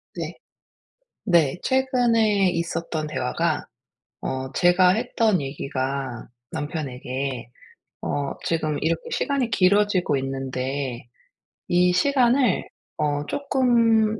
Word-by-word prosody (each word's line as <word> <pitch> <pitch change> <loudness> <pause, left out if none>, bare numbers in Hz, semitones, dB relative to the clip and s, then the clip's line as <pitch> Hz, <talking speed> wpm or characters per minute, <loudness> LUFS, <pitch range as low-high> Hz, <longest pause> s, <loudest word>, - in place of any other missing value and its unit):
네. - - -4 0.9
네. 170 -7 +3
최근에 235 -7 +3
있었던 165 -2 -2
대화가 125 -4 -1 0.6
어 130 0 -3
제가 180 +1 +5
했던 220 -2 +2
얘기가, 135 -2 -4 0.2
남편에게 135 -4 -4 0.5
어 140 -1 -2
"지금 155 -3 0
이렇게 165 +1 0
시간이 275 -4 0
길어지고 200 -5 +3
있는데 135 -1 -3 0.6
이 180 0 +3
시간을 250 +1 +3 0.3
어 145 -1 0
쪼끔 230 -6 +2
170 Hz, 195 characters per minute, -24 LUFS, 135-220 Hz, 0.9 s, 제가